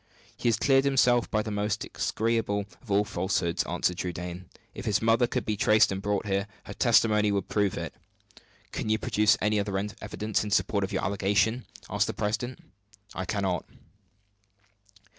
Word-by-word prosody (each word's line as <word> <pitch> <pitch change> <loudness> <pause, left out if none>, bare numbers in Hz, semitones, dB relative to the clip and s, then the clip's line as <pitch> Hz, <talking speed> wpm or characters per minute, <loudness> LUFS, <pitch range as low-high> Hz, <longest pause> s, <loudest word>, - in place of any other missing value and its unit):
"He - - -3
has 115 - +3
cleared 135 -1 +4
himself 125 -3 +3
by 110 0 0
the 110 - -5
most 105 +1 -1
execrable 110 -3 -1 0.2
of 125 - -19
all 100 +1 +3
falsehoods," 85 -3 -1
answered 90 0 -1
Trudaine. 90 0 -5 0.2
"If - - -8
his 105 -1 +2
mother 115 +2 +3
could - - -2
be 105 - 0
traced 105 +1 +4
and 95 0 -3
brought 105 +1 -1
here, 100 0 -1 0.2
her - - -8
testimony 110 -3 +3
would 100 -2 -2
prove 105 -3 +1
it." 85 -1 -5 0.8
"Can - - -3
you 110 - +3
produce 105 0 +3
any 105 0 +2
other 100 -1 -1
evidence 105 +1 -3
in 105 - -4
support 100 0 +1
of 95 - -3
your - - -1
allegation?" 100 +5 +1 0.2
asked - - 0
the - - -3
president. 115 +4 -2 0.6
"I 95 - -4
cannot." 95 -1 -1
105 Hz, 170 wpm, -28 LUFS, 100-110 Hz, 0.8 s, cleared